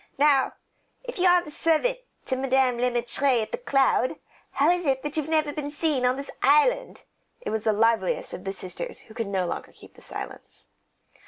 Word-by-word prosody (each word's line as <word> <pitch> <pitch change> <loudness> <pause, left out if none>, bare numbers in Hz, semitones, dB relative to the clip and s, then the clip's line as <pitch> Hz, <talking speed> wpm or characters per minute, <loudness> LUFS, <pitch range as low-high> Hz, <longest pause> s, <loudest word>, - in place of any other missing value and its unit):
"Now, 280 -2 +4 0.5
if - - -7
you 365 - +4
are 355 -3 +3
servant 330 +12 +1 0.3
to 260 - -1
Madame 260 -1 +2
Le 250 +1 +2
Maître 245 +2 +1
at - - -9
The 485 - -3
Cloud, 270 - +2 0.4
how 290 +5 +4
is 355 -2 -1
it 265 -1 +1
that 295 0 -4
you've 310 -1 -1
never 310 -2 +1
been 290 -1 -4
seen 290 -4 +1
on 250 - +2
this 275 +1 -7
island?" 485 - +3 0.4
It - - -4
was 220 -1 -2
the 220 - +4
liveliest 230 - +1
of - - -7
the 195 - -3
sisters 195 - -7
who 220 - -15
could 225 -2 -3
no 190 -2 0
longer - - -5
keep - - -17
silence. - - -9
275 Hz, 190 wpm, -26 LUFS, 245-320 Hz, 0.5 s, Now